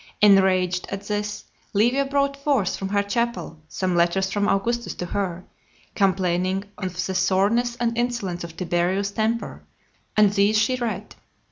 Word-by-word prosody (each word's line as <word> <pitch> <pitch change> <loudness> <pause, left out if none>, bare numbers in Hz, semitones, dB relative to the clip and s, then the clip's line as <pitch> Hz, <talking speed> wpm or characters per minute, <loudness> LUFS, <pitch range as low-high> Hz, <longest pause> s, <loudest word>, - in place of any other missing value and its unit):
Enraged 190 -3 +4
at 195 0 -5
this, 210 0 -3 0.3
Livia 240 +7 +3
brought 280 0 0
forth 275 -9 0
from 195 - -4
her 200 0 +1
chapel 235 -5 -2
some 185 +1 -2
letters 175 +3 +2
from 205 0 0
Augustus 235 +4 0
to 180 - -4
her, 180 -1 -3 0.5
complaining 185 0 +1
of 180 -3 -4
the 190 - -3
sourness 200 +6 +2
and 235 -1 -1
insolence 235 -8 -2
of 170 -1 -9
Tiberius's 185 +3 0
temper, 225 +2 -2 0.6
and 210 -1 +5
these 205 +1 +3
she 225 +4 +2
read. 220 -5 -4
200 Hz, 145 wpm, -23 LUFS, 185-230 Hz, 0.6 s, and